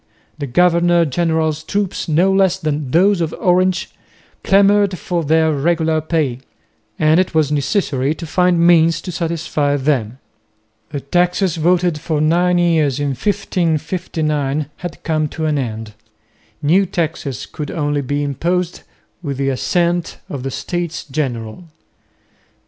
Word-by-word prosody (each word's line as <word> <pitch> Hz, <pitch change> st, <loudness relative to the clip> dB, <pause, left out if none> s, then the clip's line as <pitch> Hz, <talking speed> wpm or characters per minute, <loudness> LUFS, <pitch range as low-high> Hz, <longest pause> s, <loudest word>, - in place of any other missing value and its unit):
The 140 Hz, -, -3 dB
governor 175 Hz, +4 st, +3 dB
general's 160 Hz, 0 st, 0 dB
troops 200 Hz, +4 st, -2 dB
no 175 Hz, +5 st, +3 dB
less 190 Hz, -1 st, +3 dB
than 150 Hz, -5 st, -3 dB
those 185 Hz, +5 st, +3 dB
of 160 Hz, -, -2 dB
Orange 185 Hz, 0 st, +1 dB, 0.5 s
clamoured 200 Hz, -1 st, +3 dB
for 175 Hz, -1 st, -2 dB
their 160 Hz, +1 st, +2 dB
regular 160 Hz, +1 st, +1 dB
pay, 155 Hz, -6 st, -1 dB, 0.6 s
and 155 Hz, +2 st, +4 dB
it 185 Hz, -3 st, -1 dB
was 155 Hz, -2 st, +2 dB
necessary 145 Hz, -1 st, 0 dB
to 165 Hz, -, -7 dB
find 180 Hz, +1 st, +2 dB
means 165 Hz, -1 st, +4 dB
to 180 Hz, -, -6 dB
satisfy 160 Hz, -4 st, -1 dB
them. 130 Hz, -5 st, -1 dB, 0.7 s
The 145 Hz, -2 st, -5 dB
taxes 175 Hz, +4 st, +1 dB
voted 175 Hz, 0 st, +2 dB
for 155 Hz, 0 st, -2 dB
nine 175 Hz, +3 st, +2 dB
years 160 Hz, -6 st, +2 dB
in 145 Hz, -1 st, 0 dB
1559 155 Hz, -3 st, -1 dB
had 175 Hz, -2 st, -8 dB
come 155 Hz, -2 st, 0 dB
to 160 Hz, +2 st, -4 dB
an 150 Hz, -2 st, +1 dB
end. 110 Hz, -3 st, -5 dB, 0.7 s
New 185 Hz, +7 st, +3 dB
taxes 160 Hz, -, -3 dB
could 150 Hz, -2 st, -7 dB
only 145 Hz, -3 st, -1 dB
be 145 Hz, +2 st, -2 dB
imposed 175 Hz, +5 st, -2 dB, 0.4 s
with 140 Hz, -5 st, -4 dB
the 135 Hz, 0 st, 0 dB
assent 170 Hz, +5 st, 0 dB
of 140 Hz, -, -6 dB
the 135 Hz, -, -3 dB
States 175 Hz, +5 st, -4 dB
General. 130 Hz, -1 st, -4 dB
160 Hz, 135 wpm, -18 LUFS, 145-175 Hz, 0.7 s, and